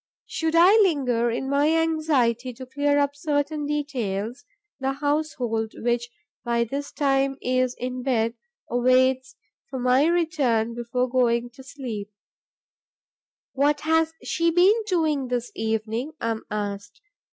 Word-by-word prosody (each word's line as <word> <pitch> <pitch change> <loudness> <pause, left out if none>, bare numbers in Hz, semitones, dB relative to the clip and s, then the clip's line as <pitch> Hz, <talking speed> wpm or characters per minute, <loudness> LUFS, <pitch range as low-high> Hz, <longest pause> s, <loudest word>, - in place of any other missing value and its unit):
Should 320 0 -2
I 345 +3 +7
linger, 265 - +2
in 240 +3 -2
my 285 +2 +2
anxiety 275 -7 +1
to 260 +2 -9
clear 285 +2 +1
up 285 0 +1
certain 290 0 -1
details, 245 -6 -3 0.4
the 270 0 -1
household, 275 -6 -1
which 240 0 -1 0.3
by 235 0 +1
this 280 +5 -5
time 275 -2 +1
is 255 0 0
in 255 0 -4
bed, 230 -3 0 0.3
waits 255 +1 +2 0.3
for 265 - -5
my 255 +4 +3
return 290 -10 +1
before 240 +2 -1
going 240 -1 +1
to 265 +2 -14
sleep: 240 -7 -6 1.4
'What 290 +2 +2
has 320 0 +2
she 335 +1 +1
been 355 +4 +5
doing 310 -8 +1
this 245 -1 -2
evening?' 225 +5 -2
I 230 - -1
am 220 - -5
asked. 205 -1 -5
260 Hz, 130 wpm, -24 LUFS, 235-290 Hz, 1.4 s, I